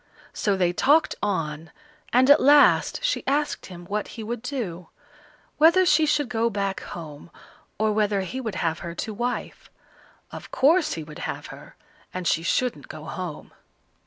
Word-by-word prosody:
So 200 -2 0
they 175 -2 +1
talked 295 - +3
on, 165 -5 -2 0.4
and 255 +2 +4
at 290 - +7
last 290 - +5
she - - 0
asked 290 +2 -1
him 175 -2 -10
what 210 +3 -3
he 225 - -5
would 230 +1 -4
do; 200 - -5 0.7
whether 340 +4 +6
she 310 -2 +4
should 290 -2 +1
go 230 0 0
back 200 -2 -2
home, 155 -2 -9 0.5
or 215 0 +1
whether 210 -2 +1
he 255 +8 -5
would 220 -6 -4
have 165 -2 -1
her 170 0 -7
to 215 - -4
wife. 245 +3 -4 0.6
Of - - -9
course 310 +5 +3
he 160 - -5
would 150 0 -11
have - - -5
her, - - -14 0.4
and 180 -1 -3
she 165 - +2
shouldn't 170 - -1
go 155 - -9
home. 175 -1 -7
210 Hz, 165 wpm, -24 LUFS, 175-265 Hz, 0.7 s, at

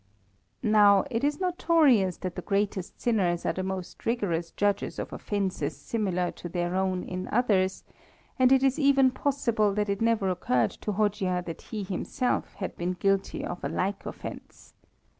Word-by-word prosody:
Now, 210 -3 +6
it 230 +1 -1
is 290 +2 +1
notorious 315 - +3
that 185 -2 -4
the - - -5
greatest 200 -2 -2
sinners 185 -8 +1
are - - +1
the 185 - -3
most 185 -1 -5
rigorous 180 -8 -1
judges 205 +3 -1
of - - -5
offences 200 -3 -2
similar 185 -6 -1
to 175 - -8
their 175 0 -2
own 185 -1 0
in 185 0 -5
others, 200 -5 +1 0.6
and 255 0 +5
it 265 0 +5
is 270 +1 +2
even 275 -2 +5
possible 235 -8 0
that 210 -1 0
it 200 +1 -1
never 225 -4 +2
occurred 125 -10 +1
to 210 - -5
Hojia 190 -3 0
that 165 -1 -6
he 215 -2 -3
himself 205 +7 -2
had 190 - -5
been 175 +1 -1
guilty 195 +1 0
of 175 - -6
a - - -1
like 195 +2 -2
offence. - - -9
200 Hz, 165 wpm, -27 LUFS, 185-230 Hz, 0.6 s, Now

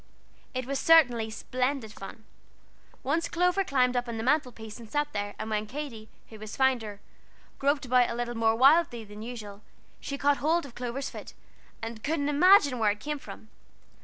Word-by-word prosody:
It 255 -1 -2
was 275 +1 -2
certainly 245 -9 +5
splendid 250 0 -2
fun. 220 +2 -10 0.8
Once 325 +5 0
Clover 360 +3 +2
climbed 255 -6 +1
up 245 0 -1
on 235 -1 -4
the 220 - -3
mantel 265 0 +2
piece 220 -1 -10
and 230 -2 -12
sat 295 +2 -1
there, 205 0 -3
and 215 - -5
when 215 -1 -2
Katy, 240 -4 -7 0.2
who 220 - -11
was 215 0 -8
finder, 235 -6 0 0.6
groped 280 0 +1
about 250 -1 +3
a 235 - -3
little 240 0 -3
more 225 0 +2
wildly 270 -1 +4
than 210 0 -11
usual, 215 -4 -8 0.4
she 280 - -5
caught 285 0 +2
hold 325 +3 +1
of 270 - -12
Clover's 250 +3 -4
foot, - - -10 0.5
and 225 -1 -6
couldn't 290 -1 0
imagine 290 -4 +5
where 215 -2 +3
it 205 0 -2
came 295 +4 -4
from. 220 - -11
250 Hz, 185 wpm, -28 LUFS, 220-285 Hz, 0.8 s, certainly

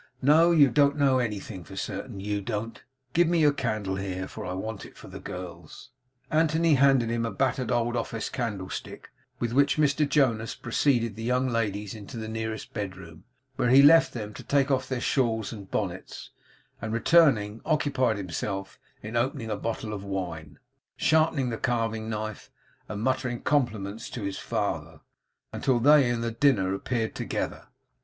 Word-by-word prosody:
'No. 155 +6 +5
You 150 -6 +5
don't 145 +2 +3
know 135 -3 +3
anything 105 -5 -4
for - - -11
certain, 100 - -5
YOU 100 +1 -2
don't. 110 +2 -4 0.3
Give 175 0 +4
me 170 0 +2
your 150 -2 +5
candle 110 -7 -2
here. 95 -1 -4 0.2
I 90 - -4
want 105 +2 -5
it - - -13
for - - -12
the - - -9
gals.' 90 -1 -9 0.4
Anthony 160 +1 +3
handed 135 -4 +4
him 115 0 0
a 115 - -1
battered 130 0 -1
old 120 0 +1
office 115 -1 -3
candlestick, 105 -7 -5 0.3
with 120 -1 -2
which 140 +4 +3
Mr 150 0 +2
Jonas 115 -6 +1
preceded 120 -3 +1
the 110 - -8
young 125 +3 +1
ladies 105 -4 -1
to 110 +1 -9
the 110 -1 -5
nearest 110 0 -5
bedroom, 95 -6 -7 0.3
where 120 - +2
he 135 +3 +7
left 165 +2 +7
them 105 -3 -5
to - - -9
take 140 0 +2
off 130 -1 0
their 130 -2 -1
shawls 115 -6 0
and 100 -3 -10
bonnets; 90 -3 -4 0.5
and 110 +1 -3
returning, 115 -6 +3
occupied 140 -7 +1
himself 95 +1 -4 0.2
in 110 +2 -6
opening 120 -1 -1
a - - 0
bottle 110 0 -4
of 100 -2 -5
wine, 90 -6 -5 0.4
sharpening 155 -5 +2
the 115 - -4
carving 115 -2 -1
knife, 110 -1 -5 0.4
and 105 0 -4
muttering 130 -1 0
compliments 110 -6 -1
to 115 - -6
his 100 -1 -3
father, - - -3 0.5
until 130 -3 +1
they 140 0 +6
and 120 -1 -1
the 115 - -1
dinner 115 -7 +2
appeared 110 +3 -2
together. - - -4
115 Hz, 165 wpm, -27 LUFS, 105-135 Hz, 0.5 s, he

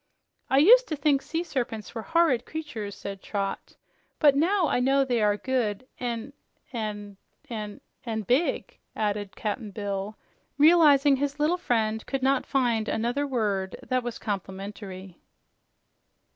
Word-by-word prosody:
"I 265 - +3
used 485 - +7
to 310 - -2
think 280 -1 +2
sea 330 +4 -3
serpents 240 -9 -4
were 225 - -4
horrid 325 -5 +2
creatures," 250 -12 -6
said 195 -1 -7
Trot, 200 -2 -4 0.4
"but 290 -3 +5
now 345 +4 +3
I - - +1
know 270 +2 +3
they 245 -3 0
are 210 -1 +3
good 245 -2 -1
and 240 +2 -4 0.4
and 205 -3 -5 0.3
and 210 -2 -5
" - - -47
"And 220 -3 -3
big," 260 - 0 0.2
added 205 -2 -2
Cap'n 215 +1 -3
Bill, 200 0 -4 0.4
realizing 290 -3 +6
his 285 +1 -2
little 305 +4 +3
friend 220 -8 0
could 270 -1 -2
not 270 0 +2
find 235 -5 +1
another 240 +6 -1
word 205 -7 -1
that 255 -1 0
was 240 -1 -5
complimentary. 195 -2 -6
240 Hz, 145 wpm, -27 LUFS, 210-280 Hz, 0.4 s, used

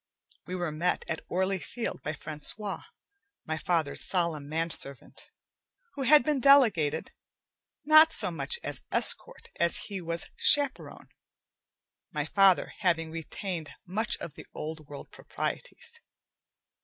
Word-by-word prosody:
We 185 - -4
were 175 -3 -2
met 170 +4 -1
at 160 -2 -4
Orly 190 +1 0
Field 235 +6 -5
by 155 - -4
Francois, 155 +7 -5 0.6
my 160 0 -3
father's 160 -5 -1
solemn 165 -6 -1
manservant, 160 -4 -5 0.7
who 280 - -6
had 290 +1 +6
been 295 0 0
delegated 220 - +4 0.7
not 310 +1 +7
so 180 - +1
much 475 - 0
as - - -2
escort - - +2
as 170 0 +3
he 195 -2 -4
was 170 0 -5
chaperone, 285 -2 +3 1.0
my - - -2
father 195 -2 +3
having 165 -1 0
retained 165 0 -5 0.2
much 215 +6 0
of 160 - -8
the - - -12
old 155 -1 -6
world 145 -1 -10
proprieties. 475 -1 -6
175 Hz, 125 wpm, -28 LUFS, 160-240 Hz, 1.0 s, not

